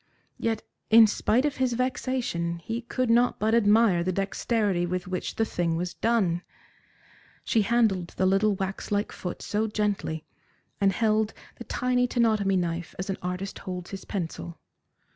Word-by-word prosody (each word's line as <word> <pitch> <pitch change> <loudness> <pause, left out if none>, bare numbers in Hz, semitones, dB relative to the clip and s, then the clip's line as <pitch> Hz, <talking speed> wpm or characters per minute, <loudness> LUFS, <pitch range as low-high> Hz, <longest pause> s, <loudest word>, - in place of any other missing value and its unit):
Yet, 225 -1 -1 0.3
in 225 0 +9
spite 225 +4 +1
of 295 - -1
his 260 -2 +1
vexation, 245 -9 -1
he 225 +7 -4
could 250 0 -1
not 240 +1 +3
but 220 +2 +1
admire 210 -4 +4
the 185 - 0
dexterity 195 0 0
with 180 +1 -2
which 185 -1 -3
the 225 - +1
thing 170 -5 -1
was 175 +2 -3
done. 195 -7 +1 1.0
She 225 - +2
handled 205 -5 +2
the 190 - +2
little 195 +2 +3
wax 190 +1 -4
like 205 +1 0
foot 180 - -6
so 215 +1 0
gently, 205 -7 -2 0.5
and 195 -1 +4
held 215 +1 +1 0.2
the 240 - -9
tiny 250 +2 +1
tenotomy 215 -6 +2
knife 170 -1 -3
as 190 +2 -3
an 190 - -3
artist 180 +2 -4
holds 180 -1 -6
his 195 -1 -7
pencil. 160 - -5
205 Hz, 160 wpm, -27 LUFS, 180-230 Hz, 1.0 s, in